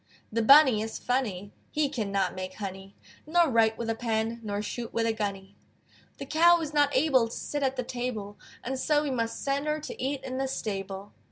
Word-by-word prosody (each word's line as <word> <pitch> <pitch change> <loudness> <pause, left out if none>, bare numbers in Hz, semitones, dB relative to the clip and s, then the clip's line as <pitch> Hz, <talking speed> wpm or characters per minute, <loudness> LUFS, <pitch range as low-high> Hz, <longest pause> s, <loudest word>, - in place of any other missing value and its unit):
The 230 +1 0
Bunny 265 -2 +7
is 220 0 -4
funny; 210 -6 -2 0.2
He 300 -1 +1
cannot 200 -8 -1
make 185 0 -6
honey, 195 -1 -7 0.3
Nor 340 0 +4
write 225 -1 +3
with 235 - -4
a 225 - +1
pen, 225 0 -2
Nor 205 -1 -3
shoot 235 +2 -5
with 230 0 0
a 225 - +1
gunny. 200 -2 -4 0.6
The 275 - -6
Cow 340 +4 +5
is 305 -2 -4
not 290 -2 +3
able 260 -5 +3
To 230 - -7
sit 290 - -3
at 265 -1 +1
the 250 - -2
table, 240 -5 -5 0.2
And 260 +2 -3
so 295 +2 +2
we 290 - -2
must 230 -3 -2
send 280 +2 -1
her 300 0 0
To 300 - -8
eat 270 +1 -2
in 260 0 -4
the 270 - 0
stable. 195 -4 -5
235 Hz, 205 wpm, -28 LUFS, 210-275 Hz, 0.6 s, Bunny